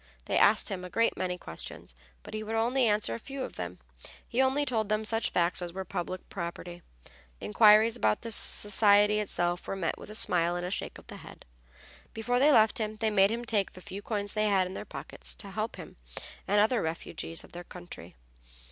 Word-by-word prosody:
They - - +1
asked 215 +2 +4
him 190 -3 -4
a 180 - -7
great 230 +5 +1
many 180 -1 -2
questions, 80 - -8 0.3
but - - -11
he 215 - -3
would 220 +1 -4
only 240 +3 +2
answer 210 - +1
a 115 - -5
few 270 -1 -6
of - - -7
them. 90 0 -6 0.5
He 245 - +1
only 265 +2 +2
told 220 -5 -1
them 215 +1 0
such 225 +1 0
facts 175 +1 +1
as 175 -1 -5
were 190 0 -5
public 180 +1 -5
property; 175 -1 -6 0.6
inquiries 215 - +5
about 105 -1 +1
the 230 - -4
society 205 0 +5
itself 175 -3 -1
were - - -3
met 180 -4 -2
with - - -11
a 215 - -7
smile 175 -5 +2
and 175 0 -3
a 180 - -4
shake - - -4
of - - -15
the - - -10
head. - - -13 0.7
Before 245 +3 0
they 290 +3 +5
left 220 0 +5
him 215 -1 -2
they 220 0 0
made 195 -1 +5
him 235 +2 -3
take 210 -4 0
the - - -12
few 195 +2 -8
coins 205 -2 -2
they 215 0 +1
had 195 -2 +3
in 185 - -7
their - - -6
pockets, - - -7
to 200 - -9
help 215 +3 -3
him - - -11 0.5
and 205 +1 +3
other 220 +2 +3
refugees 165 0 -4
of - - -16
their 175 +1 -8
country. 175 - -10
205 Hz, 215 wpm, -29 LUFS, 180-220 Hz, 0.7 s, inquiries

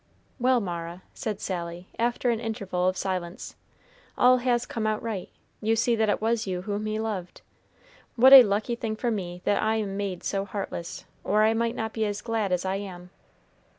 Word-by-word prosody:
"Well, 250 0 +4
Mara," 175 -2 -5
said 210 -3 -4
Sally, 175 -1 -5
after 240 +1 +1
an 230 - -1
interval 200 -5 -2
of 185 0 0
silence, 185 +2 -4 0.6
"all 255 +1 +6
has 245 -1 +1
come 225 -3 -2
out 215 0 0
right. 215 -6 -4 0.3
You 225 +1 +2
see 230 +1 +2
that 220 -1 +1
it - - +1
was 225 0 0
you 180 -1 -3
whom 205 +1 -3
he 215 0 -2
loved. 205 -6 -4 0.7
What 260 +3 +7
a 270 - +14
lucky 215 +1 0
thing 225 -2 -3
for 235 +2 -1
me 180 -4 -4
that 205 - +2
I 220 +1 +1
am 200 -3 -2
made 195 -3 -3
so 195 -1 -1
heartless, 195 -4 -5 0.2
or 210 +1 +3
I 220 +1 +4
might 230 +1 0
not 220 -1 -3
be 220 - -1
as 205 -1 -3
glad 225 -4 -1
as 180 0 0
I 190 +1 0
am." 180 -3 -8
210 Hz, 195 wpm, -27 LUFS, 185-225 Hz, 0.7 s, a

